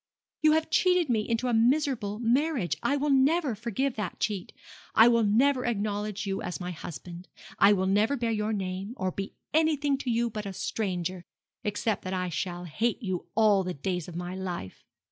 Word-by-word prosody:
'You 310 0 +5
have 320 0 0
cheated 360 -3 +3
me 220 -3 0
into 230 +2 0
a 245 - +1
miserable 235 -3 +2
marriage. 245 - +1
I 285 - +1
will 290 +1 0
never 275 +1 +3
forgive 235 +4 -2
that 210 -5 -4
cheat. 205 -5 -2 0.4
I 225 - +8
will 235 -1 +4
never 250 +5 +3
acknowledge 210 -2 -2
you 195 -1 -2
as 180 - -4
my 180 0 -4
husband. 175 +2 -8 0.3
I 200 +1 +7
will 190 -1 +1
never 210 +8 +2
bear 235 -2 0
your 215 0 -1
name, 195 +2 -3
or 185 0 -1
be 195 +2 -6 0.2
anything 295 -3 +2
to 260 - -3
you 235 0 +1
but 210 -1 -5
a 195 - -5
stranger, 185 -3 -3 0.4
except 210 +1 -1
that 185 - -3
I 180 -1 -1
shall 175 +1 -3
hate 225 - -1
you 185 -4 -3
all 210 -3 +4
the 180 0 -4
days 180 +3 -3
of 175 - -9
my 175 +1 -4
life. 180 - -6
210 Hz, 190 wpm, -28 LUFS, 185-250 Hz, 0.4 s, I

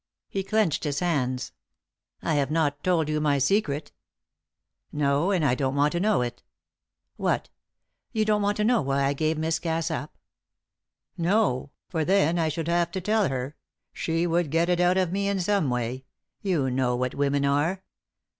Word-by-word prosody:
He 195 - -2
clenched 195 -5 +1
his 145 -2 -1
hands. 130 -8 -1 0.7
"I 160 - 0
have 140 -3 +1
not 150 -2 0
told 170 -4 +2
you 155 0 0
my 145 -2 +2
secret." 145 0 0 1.0
"No 145 +3 +1
and 180 -6 +2
I 135 - +3
don't 130 +1 -1
want 145 +1 +3
to 175 - -1
know 205 -7 +2
it." 120 0 -5 0.8
"What! - - -1 0.6
You 215 -1 +1
don't 210 -1 +2
want 205 0 0
to 210 - +1
know 235 +1 +3
why 140 0 0
I 140 +1 +2
gave 155 +2 0
Miss 160 +1 0
Cass 165 0 -1
up?" 155 -1 -5 1.0
"No; 170 - +1 0.2
for 160 -3 -1
then 175 -1 +2
I 160 -1 +1
should 160 +1 -3
have 170 0 +2
to 190 - -1
tell 210 0 +2
her 130 +2 -4 0.4
she 165 +1 -1
would 170 -2 +1
get 165 +3 +1
it 175 -1 +2
out 180 +1 +3
of 185 -3 +1
me 200 +1 0
in 200 -1 0
some 190 -5 +1
way. 125 +2 -2 0.4
You 160 -10 0
know 125 -1 +1
what 125 0 -1
women 140 0 +1
are." 155 +7 +1
160 Hz, 180 wpm, -26 LUFS, 140-185 Hz, 1.0 s, I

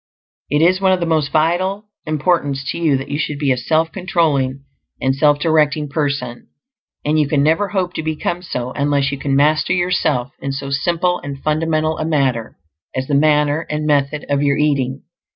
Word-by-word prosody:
It 150 +2 +2
is 185 +3 +3
of 190 -1 +3
the 170 - -1
most 155 -3 0
vital 185 +6 +1 0.2
importance 150 -3 0
to - - -5
you 155 -5 +2
that 135 - -7
you 145 - -2
should 150 -2 -2
be 140 -2 +1
a - - +3
self 160 +6 0
controlling 145 -8 0 0.4
and 135 0 +1
self 145 +1 +3
directing 150 -1 +1
person; 140 -4 -3 0.6
and 155 +1 +2
you 150 - +2
can 140 -1 +1
never 165 +7 +2
hope 185 -3 -2
to - - -3
become 160 +2 -2
so 125 -8 -4
unless 140 -1 0
you 140 - -4
can 140 -1 0
master 155 +4 +3
yourself 165 -8 0
in 135 0 -3
so 140 0 -5
simple 175 +5 0
and 140 -1 -7
fundamental 155 0 0
a 155 - -1
matter 135 -8 0 0.4
as 130 0 -1
the 145 - -3
manner 150 +1 +2
and 150 0 -2
method 145 0 +1
of 140 0 0
your 140 -1 +2
eating. 140 -3 0
150 Hz, 190 wpm, -18 LUFS, 140-160 Hz, 0.6 s, is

